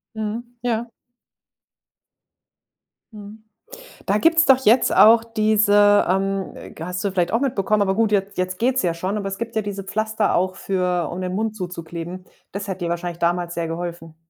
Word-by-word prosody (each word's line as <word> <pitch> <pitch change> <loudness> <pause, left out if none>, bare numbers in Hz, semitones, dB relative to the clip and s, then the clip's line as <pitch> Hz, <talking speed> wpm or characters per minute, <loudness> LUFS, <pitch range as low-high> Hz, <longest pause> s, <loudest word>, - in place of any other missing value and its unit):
Mhm. 220 +2 -3 0.2
Ja. 235 -1 -2 2.2
Mhm. 210 +1 -11 0.6
Da 200 +2 +2
gibt's 325 +5 +4
doch 265 -1 +6
jetzt 235 +3 +4
auch 225 +1 +7
diese, 210 -2 +3
ähm, 195 0 -2
ge 165 - -7
hast 180 +1 -4
du 200 - -1
vielleicht 180 -2 0
auch 230 - +2
mitbekommen, 215 -6 0
aber 190 -1 +1
gut, 225 -1 +1
jetzt 200 -1 0
jetzt 185 0 -2
geht's 255 +2 +1
ja 175 -3 0
schon, 185 +5 -3
aber 200 -1 -3
es 195 - -6
gibt 230 0 -6
ja 220 - +1
diese 200 -1 -5
Pflaster 215 +1 0
auch 185 +1 0
für 180 -4 -1
um 180 +2 -5
den 185 0 -3
Mund 215 +1 -2
zuzukleben. 175 -1 -7 0.3
Das 200 +1 -5
hätte 190 -1 -4
dir - - -2
wahrscheinlich 170 0 -4
damals 175 0 0
sehr 170 -1 -3
geholfen. 165 -1 -6
195 Hz, 175 wpm, -21 LUFS, 180-220 Hz, 2.2 s, auch